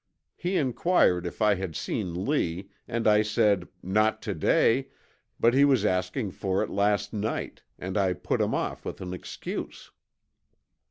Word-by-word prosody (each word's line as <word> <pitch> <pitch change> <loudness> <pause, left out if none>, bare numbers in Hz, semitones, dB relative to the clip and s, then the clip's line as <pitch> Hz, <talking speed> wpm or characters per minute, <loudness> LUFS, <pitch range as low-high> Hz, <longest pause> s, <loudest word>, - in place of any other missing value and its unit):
He 180 +2 -1
inquired 125 - +2
if 100 - -3
I 105 -1 +5
had 95 -4 -4
seen 90 -2 -3
Lee, 95 - -1 0.2
and 115 -1 -1
I 105 0 +6
said, 105 -3 +2 0.2
'Not 105 +4 +2
to - - -2
day, 130 +4 +2 0.5
but 120 +1 +4
he 135 +2 +5
was 135 -7 +4
asking 95 +3 0
for 95 +1 -1
it - - -5
last 100 +1 +1
night, 110 +1 -3 0.2
and 95 +1 -5
I 95 -3 +2
put - - -2
him - - +1
off - - -3
with - - -6
an 90 -1 -5
excuse.' 90 - -7
105 Hz, 160 wpm, -27 LUFS, 95-115 Hz, 0.5 s, I